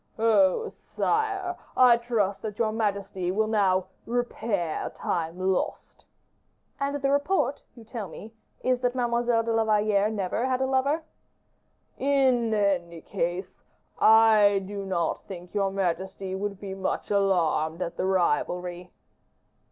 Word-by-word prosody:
"Oh, 220 - +3
sire! 395 -4 -2 0.2
I 250 -2 +7
trust 220 -5 -1
that 210 -2 -5
your 220 -2 +1
majesty 200 -4 -2
will 215 +3 +1
now 195 -4 +2 0.2
repair 225 -8 -2
time 165 0 -3
lost." 185 0 -2 0.7
"And 280 +1 -1
the 275 -1 0
report 285 -1 +1
you 235 - -13
tell 225 -3 -6
me 215 +6 -11 0.3
is, 255 -1 +2
that 245 0 0
Mademoiselle 240 -1 +1
de 230 0 -1
la 225 0 +3
Valliere 210 -1 +2
never 215 +3 -1
had 255 -1 0
a 265 - +1
lover." 275 +4 +1 1.0
"In 260 -4 +2
any 185 -6 0
case, 180 0 -3 0.5
I 215 -3 +6
do 200 0 -6
not 170 -3 -1
think 180 -2 -9
your 200 -2 +1
majesty 190 0 -3
would 200 0 -4
be 195 -2 -6
much 190 +1 -3
alarmed 180 -4 +1
at 170 - -5
the 185 - -1
rivalry." 180 0 -1
205 Hz, 135 wpm, -26 LUFS, 190-240 Hz, 1.0 s, I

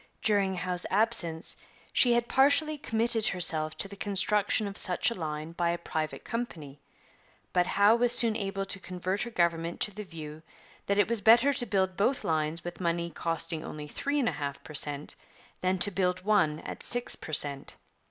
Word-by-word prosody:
During 200 -3 +1
Howe's 180 0 -2
absence 190 -6 0 0.4
she 245 -2 +4
had 240 0 +1
partially 290 +4 +3
committed 230 -5 +2
herself 155 -4 +3
to - - +1
the 200 - -11
construction 205 +1 +1
of 200 - -7
such 185 +5 +3
a - - -1
line 155 -3 -5
by 170 0 -1
a 170 - -1
private 155 -2 -4
company, 160 - -6 0.7
but 180 -1 +2
Howe 205 +3 +4
was 245 0 +3
soon 230 -2 +4
able 195 -2 -3
to 195 - -3
convert 185 +2 -4
her 240 - -2
government 170 -4 -1
to 210 - 0
the 210 +2 -7
view 155 -4 -9 0.5
that 200 - +1
it 205 - +4
was 230 -1 -1
better 235 +7 +5
to 245 - 0
build 190 -2 0
both 250 +7 +1
lines 160 0 -1
with 175 +1 -7
money 170 0 -1
costing 165 0 -3
only 150 -1 -7
three 285 - -3
and 255 - +1
a - - +2
half 140 -1 -5
per 150 - -11
cent 145 0 0 0.5
than 185 +1 +1
to 205 +3 +2
build 185 -1 -1
one 175 -8 +2
at - - -8
six 245 0 +2
per - - -10
cent. 140 -2 -2
185 Hz, 190 wpm, -29 LUFS, 165-220 Hz, 0.7 s, better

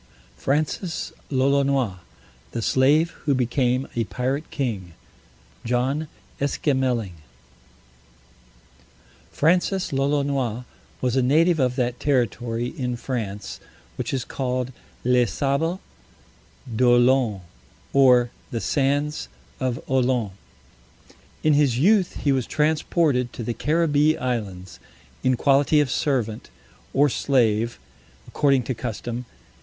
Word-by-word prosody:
FRANCIS 155 - -2 0.2
LOLONOIS 135 -5 +1 0.6
THE 115 - -2
SLAVE 145 +8 +3
WHO 145 -2 -1
BECAME 125 +1 +1
A 115 - +1
PIRATE 130 +7 -3
KING 105 - -3 0.7
JOHN 130 +6 0 0.3
ESQUEMELING 130 - 0 2.2
Francis 180 +2 +1
Lolonois 135 -4 0 0.4
was 125 -1 0
a 130 - +3
native 160 +6 +3
of 125 -2 +1
that 125 -2 -1
territory 120 -3 -1
in 125 -5 -2
France 115 -5 -5 0.4
which - - -3
is 130 -3 -2
called 130 -1 -2 0.3
Les 125 -1 +3
Sables 140 - 0 0.9
d'Olone, 120 -2 +3 0.5
or 125 -3 +5 0.2
The 115 - -3
Sands 145 +4 0 0.3
of 130 -2 -1
Olone. 125 -5 +1 1.1
In 155 - +4
his 145 -5 +3
youth 190 - +2
he 145 - +3
was 130 -3 0
transported 150 -4 +1
to 120 - -6
the 120 - -2
Caribbee 150 +3 +2
islands, 95 -8 -4 0.4
in 130 -1 +2
quality 140 +3 +3
of 145 -4 +1
servant, 120 -7 -1 0.4
or 145 +2 +4
slave, 120 -4 +1 0.5
according 140 -3 +2
to 130 - -2
custom. 120 +1 -5
130 Hz, 105 wpm, -23 LUFS, 120-145 Hz, 2.2 s, or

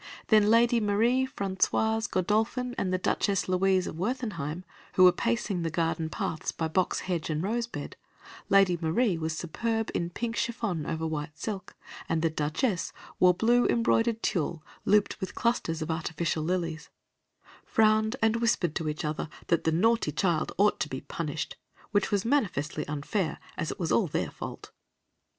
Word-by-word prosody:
Then 215 -2 +5
Lady 235 +1 +5
Marie 230 +5 +2
Françoise 220 +1 0
Godolphin 220 +6 0
and 185 - -1
the 185 - +2
Duchess 195 +1 0
Louise 185 0 +2
of - - -6
Werthenheim, 185 - -3 0.3
who 185 - +5
were 180 - +9
pacing 225 -2 -1
the 165 - -1
garden 165 0 -1
paths 155 0 -3
by 160 - -2
box 180 +3 0
hedge 175 -4 -2
and 155 +1 -1
rose 230 +4 -1
bed - - -7 0.5
(Lady 195 -2 +5
Marie 180 +5 +2
was 160 0 -2
superb 225 +7 -2
in 170 - -1
pink 230 +6 -3
chiffon 215 -10 -2
over 160 0 -2
white 150 -1 -4
silk, 195 +3 -5 0.3
and 165 0 0
the 165 - +2
Duchess 160 - -1 0.3
wore 180 -1 +6
blue 240 +5 +3
embroidered 230 -1 +2
tulle 160 -2 -1 0.2
looped 210 -1 +2
with 190 -1 -4
clusters 170 -9 0
of 160 - -3
artificial 160 0 -2
lilies), 165 -2 -2 0.7
frowned 220 +1 +3
and 225 +1 +3
whispered 230 -8 +1
to 155 - -2
each 150 +1 -4
other 150 0 -3 0.2
that 170 -1 +2
the 160 - +3
naughty 225 +8 +2
child 170 -5 0
ought 205 +1 +3
to 135 +2 -1
be 130 -1 -5
punished, 155 -2 -4 0.3
which 205 -2 +2
was 205 -1 0
manifestly 180 - 0
unfair, 150 +4 -2 0.2
as 155 - -3
it - - -6
was 165 -3 -1
all 210 - +3
their 145 - -2
fault. - - -8
185 Hz, 165 wpm, -28 LUFS, 160-225 Hz, 0.7 s, were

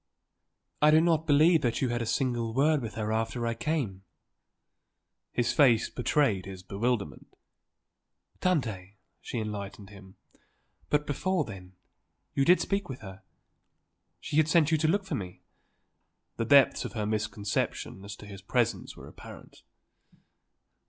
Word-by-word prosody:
"I 150 - +6
do 155 +1 +6
not 165 -1 +2
believe 155 +2 +5
that 120 -4 0
you 130 - 0
had 120 0 -1
a 115 - -3
single 120 -4 -1
word 150 +2 +3
with 115 -2 -6
her 110 -1 -2
after 115 +1 -1
I 115 - 0
came!" 115 -6 -2 1.3
His 120 - 0
face 120 -6 +4
betrayed 125 - +1
his 95 -2 -9
bewilderment. 100 - -2 1.1
"Tante," 110 - -1 0.2
she - - -5
enlightened 105 -2 -5
him. 95 -2 -14 0.7
"But 150 0 +1
before 185 +6 0
then? 95 -3 -10 0.6
You 135 - +2
did 180 +4 +6
speak 200 -3 -2
with 130 - -7
her? 95 -2 -10 1.0
She 160 -3 -3
had 155 -1 +4
sent 160 -1 +3
you 160 - +4
to 155 - +2
look 195 +4 +1
for - - -5
me?" 90 -3 -5 0.9
The 115 - -1
depths 140 +1 +5
of - - -6
her 110 -3 -2
misconception 105 -2 -2
as 100 0 -7
to 105 - -13
his 100 -2 -10
presence 120 +4 -1
were - - -11
apparent. - - -13
120 Hz, 145 wpm, -29 LUFS, 100-150 Hz, 1.3 s, I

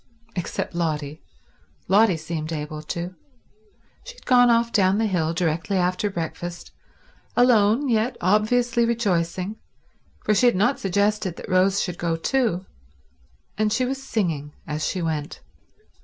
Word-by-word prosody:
Except 175 -1 -3
Lotty. 155 -3 -2 0.7
Lotty 195 -1 +4
seemed 160 0 -5
able 150 -1 -4
to. 170 +4 -5 0.9
She - - -10
had - - -19
gone 245 -2 +5
off 235 0 +3
down 195 -2 +3
the 225 - +1
hill 175 -6 0
directly 170 +2 -1
after 180 +3 0
breakfast, 175 -1 -5 0.7
alone 240 +1 +4
yet 235 +1 +1
obviously 235 +5 +2
rejoicing, 195 -4 -1 0.7
for 215 - +3
she 230 +5 +4
had 240 - +3
not 235 +9 +2
suggested 200 -1 0
that - - -9
Rose 190 +2 +3
should 180 -2 -5
go 170 -1 0
too, 190 0 0 0.9
and 215 -1 +2
she 250 +4 +1
was 270 +1 -3
singing 165 - -2
as 155 -1 -3
she 180 +3 -1
went. 155 -2 -3
190 Hz, 140 wpm, -23 LUFS, 170-225 Hz, 0.9 s, gone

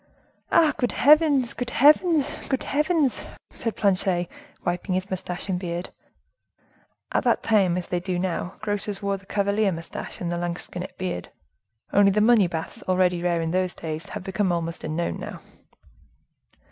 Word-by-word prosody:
"Ah! 315 -2 +5
good 245 -3 0
heavens! 290 -3 +4
good 245 0 -4
heavens! 300 +2 +4
good 265 - 0
heavens!" 300 -2 +1 0.3
said 230 -3 -4
Planchet, 185 -3 +1 0.4
wiping 175 +2 -1
his 185 +1 -3
mustache 180 -1 -4
and 185 -2 -1
beard. 175 0 -4 1.2
At - - +1
that - - +2
time, 195 -5 +3
as 180 - -4
they 180 - -1
do 180 0 -2
now, 180 0 -2
grocers 205 -1 -2
wore 200 0 0
the 195 0 -19
cavalier 200 0 +1
mustache 165 -1 -7
and 175 -1 -3
the 175 - -1
lansquenet 175 +1 -5
beard, 185 - -4 0.6
only 200 0 +6
the 200 +2 +2
money 215 -3 +5
baths, 165 -2 -5
already 180 -1 +2
rare 175 -1 +1
in 165 0 -2
those 185 0 0
days, 160 +3 -5
have - - -6
become 190 0 0
almost 170 -1 -3
unknown 160 +2 -2
now. - - -7
190 Hz, 160 wpm, -25 LUFS, 175-220 Hz, 1.2 s, only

